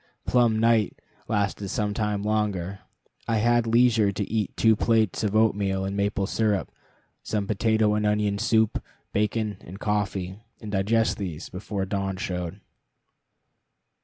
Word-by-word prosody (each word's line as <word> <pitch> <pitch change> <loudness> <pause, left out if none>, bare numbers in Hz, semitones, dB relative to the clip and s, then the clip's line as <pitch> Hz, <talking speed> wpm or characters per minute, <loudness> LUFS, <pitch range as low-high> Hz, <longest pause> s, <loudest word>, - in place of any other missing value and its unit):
"Plumb 120 -3 +3
night" 115 -2 +2 0.3
lasted 100 -2 -1
some 105 +1 -1
time 105 -2 -1
longer. 100 -3 -1 0.5
I 115 - +1
had 120 +1 +2
leisure 115 -3 +4
to 100 0 -4
eat 110 -3 -1
two 110 -1 +5
plates 110 -2 +1
of 105 -1 0
oatmeal 100 -3 +2
and 100 +1 -3
maple 100 0 0
syrup, 105 -1 0 0.5
some 105 -2 -2
potato 110 +1 +2
and 105 0 0
onion 105 -1 +1
soup, 110 -1 +2 0.3
bacon, 105 0 0
and 95 +4 -10
coffee, 100 -3 -2 0.2
and 105 -2 -7
digest 110 +4 +1
these, 90 -5 -5
before 95 +1 -4
dawn 95 0 -2
showed. 90 -2 -4
105 Hz, 135 wpm, -26 LUFS, 100-110 Hz, 0.5 s, two